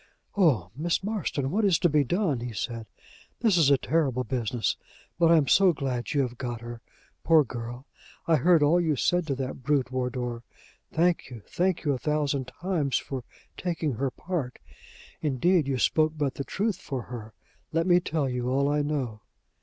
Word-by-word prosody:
"O 135 Hz, -, +3 dB
Miss 165 Hz, +6 st, -1 dB
Marston! 190 Hz, -10 st, -2 dB
what 215 Hz, +5 st, +1 dB
is 190 Hz, -5 st, +4 dB
to 175 Hz, -, +3 dB
be 150 Hz, -2 st, +3 dB
done?" 170 Hz, -, 0 dB
he 120 Hz, 0 st, -5 dB
said. 115 Hz, +2 st, -4 dB, 0.5 s
"This 220 Hz, -6 st, +4 dB
is 160 Hz, -5 st, +5 dB
a 140 Hz, -, +5 dB
terrible 135 Hz, -4 st, 0 dB
business! 120 Hz, -1 st, -1 dB, 0.4 s
But 165 Hz, -1 st, +5 dB
I 165 Hz, -, +7 dB
am 145 Hz, -3 st, +2 dB
so 190 Hz, +3 st, +5 dB
glad 130 Hz, -4 st, -3 dB
you 145 Hz, -, +3 dB
have 125 Hz, -2 st, -4 dB
got 120 Hz, -3 st, -4 dB
her, 120 Hz, 0 st, -8 dB, 0.4 s
poor 160 Hz, -2 st, +6 dB
girl! 120 Hz, 0 st, -7 dB, 0.4 s
I 165 Hz, -2 st, +4 dB
heard 165 Hz, +2 st, +4 dB
all 165 Hz, +4 st, +4 dB
you 160 Hz, -3 st, +1 dB
said 175 Hz, +5 st, +1 dB
to 140 Hz, -, 0 dB
that 130 Hz, 0 st, -5 dB
brute, 135 Hz, -3 st, +1 dB
Wardour. 125 Hz, -2 st, -2 dB, 0.5 s
Thank 170 Hz, -2 st, +1 dB
you, 115 Hz, -5 st, -10 dB
thank 180 Hz, -1 st, 0 dB
you 145 Hz, -, +2 dB
a 130 Hz, -, -3 dB
thousand 145 Hz, 0 st, 0 dB
times, 170 Hz, -7 st, -1 dB
for 130 Hz, -3 st, -5 dB, 0.3 s
taking 165 Hz, -5 st, -2 dB
her 135 Hz, +4 st, -1 dB
part. 150 Hz, -4 st, -4 dB, 0.6 s
Indeed, 155 Hz, +3 st, +2 dB
you 135 Hz, -2 st, 0 dB
spoke 155 Hz, +5 st, +2 dB
but 145 Hz, -3 st, 0 dB
the 140 Hz, -, -4 dB
truth 200 Hz, -, -1 dB
for 135 Hz, -9 st, -5 dB
her. 110 Hz, -3 st, -9 dB, 0.4 s
Let 165 Hz, +1 st, +1 dB
me 175 Hz, -1 st, +5 dB
tell 155 Hz, -4 st, -1 dB
you 125 Hz, -1 st, -2 dB
all 140 Hz, +2 st, +2 dB
I 150 Hz, 0 st, +2 dB
know." 135 Hz, -7 st, -2 dB
140 Hz, 185 wpm, -27 LUFS, 125-165 Hz, 0.6 s, I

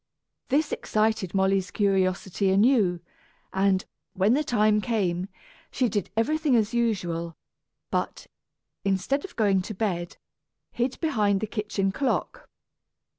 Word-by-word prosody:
This 290 Hz, +3 st, +1 dB
excited 215 Hz, -4 st, 0 dB
Molly's 190 Hz, -1 st, +2 dB
curiosity 195 Hz, -1 st, +1 dB
anew 195 Hz, -3 st, +3 dB, 0.5 s
and, 190 Hz, 0 st, +2 dB, 0.3 s
when 195 Hz, +4 st, +3 dB
the 275 Hz, -, +3 dB
next 305 Hz, -, -3 dB
time 215 Hz, -2 st, +3 dB
came, 190 Hz, -6 st, -1 dB, 0.4 s
she 250 Hz, -3 st, 0 dB
did 205 Hz, 0 st, -2 dB
everything 300 Hz, +4 st, +2 dB
as 220 Hz, -1 st, +1 dB
usual, 175 Hz, -8 st, -1 dB, 0.5 s
but, -, -, -2 dB, 0.6 s
instead 195 Hz, +9 st, 0 dB
of 375 Hz, -, -9 dB
going 200 Hz, -4 st, +2 dB
to 215 Hz, +3 st, -6 dB
bed, 180 Hz, -4 st, -2 dB, 0.5 s
hid 245 Hz, +2 st, -2 dB
behind 210 Hz, -, +2 dB
the 220 Hz, -, -2 dB
kitchen 210 Hz, -2 st, -2 dB
clock. 265 Hz, +5 st, -2 dB
205 Hz, 125 wpm, -26 LUFS, 190-235 Hz, 0.6 s, anew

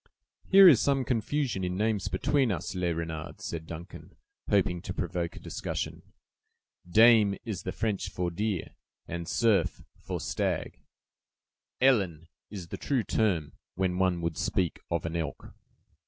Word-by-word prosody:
"Here 195 Hz, 0 st, +9 dB
is 140 Hz, -10 st, +8 dB
some 135 Hz, -2 st, +1 dB
confusion 120 Hz, -2 st, -1 dB
in 90 Hz, 0 st, -2 dB
names 105 Hz, -2 st, 0 dB
between 140 Hz, -3 st, +1 dB
us, 90 Hz, -1 st, -3 dB
Le 90 Hz, -2 st, 0 dB
Renard," 80 Hz, 0 st, -5 dB
said 80 Hz, -1 st, -5 dB
Duncan, 85 Hz, +1 st, -10 dB, 0.3 s
hoping 90 Hz, -1 st, +2 dB
to 90 Hz, -, -6 dB
provoke 85 Hz, -2 st, -3 dB
a -, -, -9 dB
discussion. -, -, -4 dB, 0.9 s
"Daim 110 Hz, 0 st, +6 dB
is 105 Hz, -6 st, -4 dB
the 95 Hz, -, -4 dB
French 105 Hz, +1 st, -2 dB
for 90 Hz, -1 st, -2 dB
deer, 100 Hz, 0 st, -2 dB, 0.4 s
and 85 Hz, 0 st, -5 dB
cerf 115 Hz, 0 st, +1 dB, 0.2 s
for -, -, -4 dB
stag; -, -, -2 dB, 1.0 s
elan 95 Hz, -, +2 dB, 0.2 s
is 95 Hz, -5 st, -8 dB
the -, -, -5 dB
true 135 Hz, -5 st, 0 dB
term, 90 Hz, -12 st, 0 dB, 0.2 s
when 90 Hz, -1 st, 0 dB
one 90 Hz, -2 st, +2 dB
would 85 Hz, -2 st, -2 dB
speak 90 Hz, -3 st, 0 dB
of 85 Hz, -1 st, -1 dB
an 85 Hz, 0 st, -3 dB
elk." 80 Hz, -3 st, -4 dB
95 Hz, 145 wpm, -29 LUFS, 85-110 Hz, 1.0 s, Here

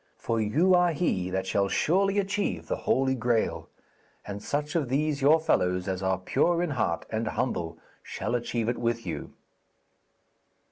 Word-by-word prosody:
For 115 Hz, -1 st, -1 dB
you 155 Hz, -, +3 dB
are 175 Hz, -1 st, +4 dB
he 95 Hz, -, 0 dB
that 95 Hz, +1 st, -2 dB
shall 100 Hz, +1 st, +1 dB
surely 195 Hz, -, +2 dB
achieve 195 Hz, -, -1 dB
the -, -, -1 dB
Holy 130 Hz, 0 st, +3 dB
Graal, 110 Hz, -9 st, 0 dB, 0.6 s
and 100 Hz, 0 st, -6 dB
such 145 Hz, +5 st, -2 dB
of 150 Hz, -7 st, 0 dB
these 145 Hz, +2 st, 0 dB
your 150 Hz, +4 st, +6 dB
fellows 90 Hz, -, +1 dB
as 95 Hz, -1 st, -2 dB
are 95 Hz, -1 st, +1 dB
pure 170 Hz, -, +1 dB
in 175 Hz, -, -2 dB
heart 110 Hz, -11 st, -1 dB
and 110 Hz, 0 st, -1 dB
humble 85 Hz, -9 st, -2 dB, 0.2 s
shall -, -, -4 dB
achieve 120 Hz, -1 st, -1 dB
it 120 Hz, -, -1 dB
with 115 Hz, 0 st, -1 dB
you.' -, -, -5 dB
120 Hz, 160 wpm, -27 LUFS, 95-155 Hz, 0.6 s, your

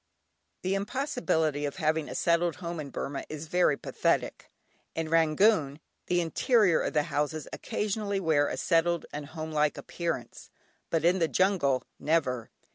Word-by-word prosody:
The 185 Hz, +1 st, 0 dB
impossibility 195 Hz, -, 0 dB
of 145 Hz, -, -2 dB
having 160 Hz, -3 st, 0 dB
a -, -, -6 dB
settled 170 Hz, 0 st, +2 dB
home 170 Hz, -2 st, -5 dB
in 145 Hz, -2 st, -5 dB
Burmah 140 Hz, +1 st, -4 dB
is 155 Hz, 0 st, -6 dB
very 160 Hz, -3 st, +2 dB
pathetic. -, -, -1 dB, 0.5 s
In 160 Hz, -1 st, -2 dB
Rangoon, 160 Hz, -1 st, +3 dB, 0.3 s
the 175 Hz, 0 st, +2 dB
interior 190 Hz, -, +3 dB
of -, -, -2 dB
the 150 Hz, -2 st, +3 dB
houses 150 Hz, +1 st, -2 dB
occasionally 205 Hz, -1 st, -2 dB
wear 155 Hz, -5 st, +2 dB
a -, -, -3 dB
settled 170 Hz, 0 st, +2 dB
and 145 Hz, -1 st, -5 dB
homelike 155 Hz, -1 st, -1 dB
appearance, 165 Hz, -9 st, -5 dB, 0.4 s
but 165 Hz, 0 st, 0 dB
in 180 Hz, +2 st, +4 dB
the 165 Hz, -, +3 dB
jungle, 170 Hz, -9 st, +2 dB, 0.2 s
never. 130 Hz, -7 st, 0 dB
160 Hz, 145 wpm, -29 LUFS, 150-180 Hz, 0.5 s, in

